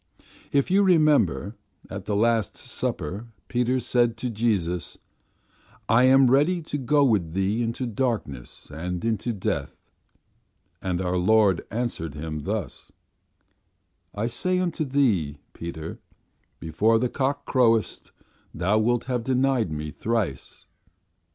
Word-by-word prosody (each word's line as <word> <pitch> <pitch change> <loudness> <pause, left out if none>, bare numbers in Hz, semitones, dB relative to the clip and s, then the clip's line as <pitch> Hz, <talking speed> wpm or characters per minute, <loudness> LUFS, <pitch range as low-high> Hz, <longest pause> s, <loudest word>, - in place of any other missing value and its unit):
"If 140 +5 +1
you 195 +2 +5
remember 150 - +3 0.3
at - - -7
the 105 - -1
Last 115 -1 +1
Supper 100 +10 -4 0.2
Peter 125 +1 +1
said 120 -1 +1
to 125 +1 -3
Jesus, 100 -7 -1 0.9
'I 115 +3 +4
am 130 -1 +6
ready 150 +7 +3
to 145 -1 -4
go 145 +3 +3
with 100 -11 +1
Thee 95 +5 0
into 115 +2 -2
darkness 110 - -4
and 90 +5 -4
unto 115 +1 -1
death.' 100 -5 -4 0.9
And 90 -1 -2
our 90 0 0
Lord 100 -1 +3
answered 110 - -3
him 75 -1 -5
thus: 100 - -4 1.2
'I 105 +2 -1
say 185 +10 -1
unto 175 -4 -1
thee, 110 - +1 0.2
Peter, 80 -1 -7 0.6
before 105 +8 +2
the 125 +3 +1
cock 140 +3 -2
croweth 115 -4 +1 0.5
thou 95 +6 +2
wilt 120 +2 +1
have 125 -2 -2
denied 130 -5 +1
Me 75 0 -4
thrice. 105 - -3
115 Hz, 125 wpm, -25 LUFS, 90-130 Hz, 1.2 s, am